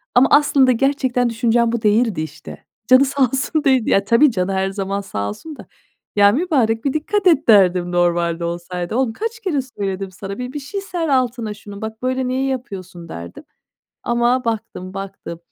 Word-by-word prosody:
ama 250 +2 +6
aslında 280 -3 +5
gerçekten 255 -1 +1
düşüncem 230 0 +1
bu 235 -1 -2
değildi, 215 -4 +2
işte. 155 - -9 0.2
Canı 255 +2 +6
sağ 275 0 0
olsun 265 +5 -1
değildi. 260 -4 +3
Ya, 195 - +3
tabii 240 +6 +4
canı 185 -1 -1
her 190 0 0
zaman 195 0 -3
sağ 100 - -4
olsun 310 - -8
da. - - -12 0.5
”Ya 200 0 +6
mübarek, 250 - 0
bir 275 - +1
dikkat 380 +6 0
et.” 310 -4 +3
derdim 180 -4 +5
normalde 175 -1 +1
olsaydı. 175 +2 -4
"Oğlum, 250 -3 0
kaç 450 - -4
kere 370 -10 -1
söyledim 195 -6 -5
sana? 195 +2 -7
Bir 250 +1 -5
bir 295 - -4
şey 340 +9 -5
ser 350 -4 -3
altına 245 -5 0
şunun. 205 -1 -11
Bak, 220 0 -6
böyle 255 0 -1
niye 260 +1 -1
yapıyorsun." 190 -10 -6
derdim 85 +1 -9 0.6
ama 240 +2 +1
baktım, 205 -5 -4
baktım, 195 -3 -7
230 Hz, 180 wpm, -19 LUFS, 195-265 Hz, 0.6 s, ama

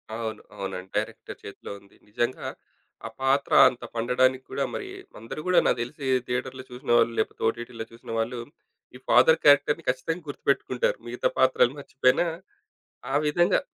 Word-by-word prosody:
అవును. 110 -2 -4
అవునండి. 95 -2 -6
డైరెక్టర్ - - -4
చేతిలో - - -9
ఉంది. 100 0 -23
నిజంగా 120 +4 -2 0.6
ఆ - - -7
పాత్ర 135 +1 +1 0.2
అంత 125 - -11
పండడానికి 130 +2 +2
కూడా - - -1
మరి 400 - -4 0.3
అందరూ 115 - -7
గూడా 185 - +5
నాకు - - +2
తెలిసి 130 +4 -6 0.2
థియేటర్‌లో 125 +1 -3
చూసినవాళ్ళు 120 -2 +2
లేపోతే, - - -2
ఓటీటీలో 115 0 -4
చూసిన 115 0 -11
వాళ్ళు 120 +2 -2 0.6
ఈ - - -8
ఫాదర్ 130 +7 +6
క్యారెక్టర్‌ని 145 0 +4
ఖచ్చితంగా 160 +7 -2
గుర్తుపెట్టుకుంటారు 140 -3 0
మిగతా 120 +1 0
పాత్రలు 130 -1 +4
మర్చిపోయినా. 135 +2 +2 0.9
ఆ - - -2
విధంగా 175 +4 +3
125 Hz, 140 wpm, -26 LUFS, 115-140 Hz, 0.9 s, ఫాదర్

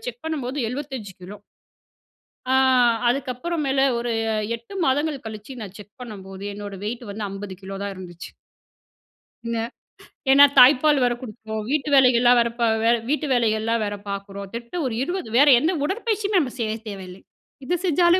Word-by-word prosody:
Check - - -6
பண்ணும்போது 285 -4 -3
75 260 -5 -6
kilo. 190 +3 -9 1.1
ஆ - - +3 0.5
அதுக்கப்புறம் 275 +6 -2
மேல 270 0 +1 0.2
ஒரு 235 0 -2 0.4
8 235 +12 -14
மாதங்கள் 285 +1 0
கழிச்சு 215 +3 -8
நான் 200 -2 -8
செக் 205 +5 -14
பண்ணம்போது 195 -4 -9
என்னோட 205 -1 -7
வெயிட் 235 +3 -4
வந்து 210 +1 -4
50 195 -1 -7
கிலோ 195 +1 -7
தான் 200 0 -3
இருந்துச்சு. 175 -2 -10 1.1
இன்ன 230 0 -2 0.7
ஏனா, 280 +1 +8 0.2
தாய்ப்பால் 275 +3 +6
வேற 245 0 +2
குடுக்குறோம் 220 -2 -6
வீட்டு 300 0 0
வேலைகள்லாம் 245 -2 +5
வேற 235 0 +2
ப - - -3 0.2
வ - - +1 0.2
வீட்டு 300 +1 0
வேலைகள்லாம் 225 -1 +1
வேற 205 0 -2
பார்க்குறோம். 200 0 -6
திட்ட 235 +5 -7
ஒரு 250 - -2
20 350 -2 -4
வேற 285 +3 +6
எந்த 315 +7 +1
உடற்பயிற்சியுமே 415 +3 0
நம்ப 275 -7 -1
செய்ய 220 -3 -1 0.2
தேவையில்லை. 190 -2 -9 0.4
இது 350 +7 0
செஞ்சாலே 350 +1 +4
240 Hz, 150 wpm, -23 LUFS, 205-285 Hz, 1.1 s, ஏனா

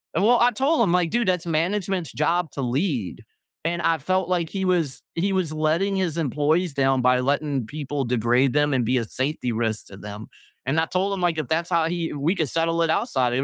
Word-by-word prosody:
And 185 - +2
well, 240 +3 +5
I 240 +1 +5
told 270 +7 +1
him, 200 -7 +3
like, 180 -2 +2
"Dude, 235 +1 0
that's 180 -2 +1
management's 175 0 -1
job 165 +1 0
to 140 - -5
lead," 130 - -2 0.4
and 170 +1 -1
I 165 0 +2
felt 185 +4 -1
like 175 -3 0
he 195 -1 -3
was 165 -8 0
he 195 +4 0
was 185 -5 0
letting 160 +6 0
his 175 -4 -1
employees 155 +3 +1
down 135 -1 +2
by 125 0 +4
letting 140 -1 0
people 145 +2 -4
degrade 120 +2 +2
them 145 0 +2
and 125 -3 +1
be 125 +3 +2
a - - -2
safety 130 +2 -2
risk 110 -1 -2
to 100 - -12
them, 105 +2 -8 0.4
and 140 +5 +1
I 160 - +2
told 190 +4 -1
him, 195 - -3
like, 175 -2 +1
"If 150 - -3
that's 165 +2 0
how 170 -2 +2
he 170 -1 -2
we 150 +6 0
could 160 -5 0
settle 165 +2 0
it 165 - 0
outside, 130 - +1
it 130 +2 +1
160 Hz, 230 wpm, -24 LUFS, 135-180 Hz, 0.4 s, well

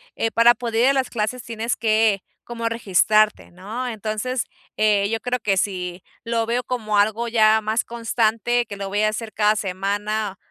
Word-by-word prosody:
eh 225 - 0
para 230 +1 +6
poder 230 -1 -1
ir 260 - +5
a - - +3
las 265 -2 0
clases 235 +2 -2
tienes 230 0 -3
que 215 -2 +2 0.2
como 230 -1 -4
registrarte, 215 -1 +2
¿no? 210 +8 -5
Entonces, 220 +2 -3 0.3
eh, 205 -2 +2
yo 225 0 -1
creo 250 +1 -1
que 205 -3 +1
si 180 -2 -2 0.2
lo 230 0 0
veo 240 +2 0
como 220 -5 -2
algo 220 +3 +2
ya 220 -1 +4
más 220 +2 -1
constante 235 +1 0
que 205 - -8
lo 195 -1 -5
voy 205 +2 0
a 215 - +3
hacer 220 +1 -5
cada 210 0 +3
semana, 205 +1 -2
220 Hz, 185 wpm, -22 LUFS, 210-235 Hz, 0.3 s, para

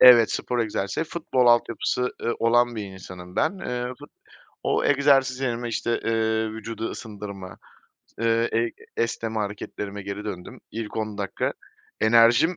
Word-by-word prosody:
Evet, 120 -3 +9
spor 125 - -1
egzersizleri. 110 - -1
Futbol 130 -7 +1
altyapısı, 120 +1 +3
ııı, 120 - 0
olan 120 +1 +3
bir 105 - -3
insanım 90 -2 -10
ben. 190 +5 +1
Iıı, 125 -4 -3
fut 145 - -12 0.5
o - - +1
egzersiz 135 -2 +4
yerime, 120 -2 -1
işte, 115 +1 0
eee, 110 -1 +1
vücudu 110 +1 -4
ısındırma, 100 -4 -7 0.6
ııı, 115 0 +3
ey 115 0 +1 0.2
esneme 115 -1 -1
hareketlerime 105 -1 -4
geri 100 +2 -5
döndüm. 90 -4 -6
İlk 110 -1 -5
10 110 -2 -3
dakika 100 -2 -1 0.5
enerjim 115 +9 +5
115 Hz, 140 wpm, -25 LUFS, 105-120 Hz, 0.6 s, Evet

